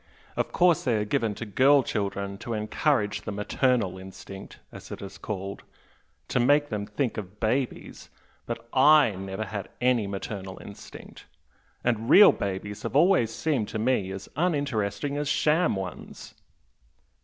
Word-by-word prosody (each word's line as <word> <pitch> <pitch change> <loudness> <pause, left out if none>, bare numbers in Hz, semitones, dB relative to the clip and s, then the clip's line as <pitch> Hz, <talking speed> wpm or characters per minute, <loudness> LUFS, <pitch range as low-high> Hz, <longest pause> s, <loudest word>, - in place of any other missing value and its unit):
Of - - -1
course 175 -3 +3
they 120 -4 +1
are 105 -1 0
given 115 -3 0
to 115 - -6
girl 135 +6 +4
children 100 -2 -3
to 115 - -4
encourage 105 0 0
the - - -5
'maternal 105 -1 0
instinct' 95 +1 -10
as - - -11
it - - -6
is 100 -1 -9
called 100 -2 -5 0.7
to - - +1
make 145 +4 +3
them 105 -2 -3
think 135 -5 -2
of 105 -1 -7
babies, 120 +4 -2 0.4
but 115 0 -5
I 145 -1 +6
never 95 +1 -5
had 100 0 -6
any 125 -4 +2
'maternal 95 -1 -6
instinct'! 100 - -12 0.6
and 115 -1 0
real 205 +6 +9
babies 100 +1 -4
have - - -5
always 160 - +4
seemed 135 -9 -1
to - - -4
me 110 -4 +1
as 95 0 -7
uninteresting 140 - -1
as 145 0 -2
sham 155 0 +2
ones!" 95 -3 -7
110 Hz, 150 wpm, -26 LUFS, 100-140 Hz, 0.7 s, real